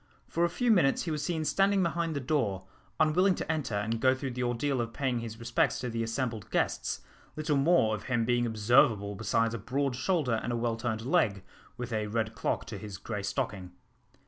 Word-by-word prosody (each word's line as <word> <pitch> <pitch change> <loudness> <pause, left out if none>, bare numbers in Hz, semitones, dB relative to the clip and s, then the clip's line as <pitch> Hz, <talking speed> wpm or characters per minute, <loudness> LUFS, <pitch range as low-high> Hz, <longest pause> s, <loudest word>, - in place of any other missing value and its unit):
For 170 - 0
a 175 - +3
few 240 +7 +1
minutes 175 -10 +3
he 165 - -3
was 150 -1 -2
seen 160 -1 -1
standing 195 +3 +3
behind 170 -1 -1
the - - 0
door, 125 -9 0 0.4
unwilling 180 +5 +4
to - - -2
enter 150 -9 -2
and 110 +3 -1
go 130 0 +4
through 130 0 -4
the 125 +1 -4
ordeal 125 +2 0
of 115 0 -4
paying 130 -4 -1
his 115 -1 -6
respects 115 0 +1
to 125 -2 -3
the 115 0 -2
assembled 115 -2 -3
guests, - - -1 0.3
little 155 -1 0
more 140 -6 +4
of 105 - -5
him 120 -3 +1
being 120 0 +2
observable 110 -2 +3
besides 115 +3 0
a 115 - -3
broad 130 +4 -1
shoulder 135 -6 +1
and 120 - -3
a 120 - 0
well 115 -1 0
turned 115 -1 -3
leg, 125 - +2 0.3
with 125 -1 -5
a 105 -1 -1
red 110 +1 -1
clock 120 - -2
to 105 -3 -7
his 100 -1 -7
grey 105 +1 -4
stocking. 95 -2 -3
120 Hz, 210 wpm, -30 LUFS, 110-150 Hz, 0.4 s, unwilling